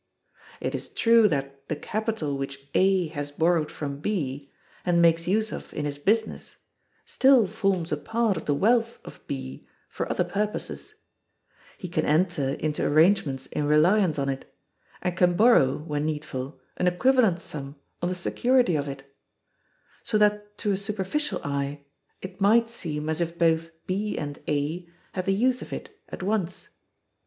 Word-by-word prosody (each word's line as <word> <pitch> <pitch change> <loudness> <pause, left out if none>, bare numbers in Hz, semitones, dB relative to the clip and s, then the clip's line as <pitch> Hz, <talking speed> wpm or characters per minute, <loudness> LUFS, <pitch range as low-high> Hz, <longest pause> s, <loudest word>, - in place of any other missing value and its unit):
It - - -3
is - - -3
true 230 -1 +5
that 140 -4 -3
the 155 - -2
capital 210 -4 -2
which 135 0 -6
A 190 -3 +3
has 145 -2 -4
borrowed 160 +1 +1
from 140 -2 -5
B, 145 -7 -3 0.3
and 175 -1 +2
makes 170 0 +4
use 215 +3 +1
of - - -7
in 150 - -2
his 145 -1 -4
business, 220 +8 0 0.5
still 265 -4 +5
forms 195 -4 -1
a 150 - +1
part 225 +5 0
of 160 - -6
the 145 - +1
wealth 230 +6 +2
of - - -11
B 65 0 -5 0.3
for - - -4
other - - +1
purposes; 205 +4 -4 0.8
he 185 - -6
can 160 -2 -1
enter 155 -4 +1
into 150 -1 -2
arrangements 155 -4 +3
in 150 - -2
reliance 165 +3 +4
on 140 -1 -1
it, 135 -1 -4 0.5
and 180 -1 -1
can 180 -1 +3
borrow, 205 - +5
when 150 -1 -3
needful, 150 -3 -4 0.2
an 180 - +1
equivalent 215 0 +3
sum 140 -4 -6 0.3
on 175 - 0
the 185 - -2
security 240 +2 +2
of 145 -1 -1
it; 135 -1 -6 1.0
so 215 - 0
that 210 0 +1
to 205 - 0
a 195 - +1
superficial 205 +9 -2
eye 140 0 -3 0.4
it 185 +1 -8
might 230 +3 +4
seem 155 -9 -4
as 160 +2 -1
if 170 0 -2
both 165 -1 +2 0.2
B 205 +3 -2
and 145 -1 -5
A 155 +4 -2 0.2
had 185 -1 -3
the 195 - +2
use 250 +4 +2
of - - -9
it - - -7
at - - -7
once. 190 -3 -2
170 Hz, 165 wpm, -26 LUFS, 145-205 Hz, 1.0 s, true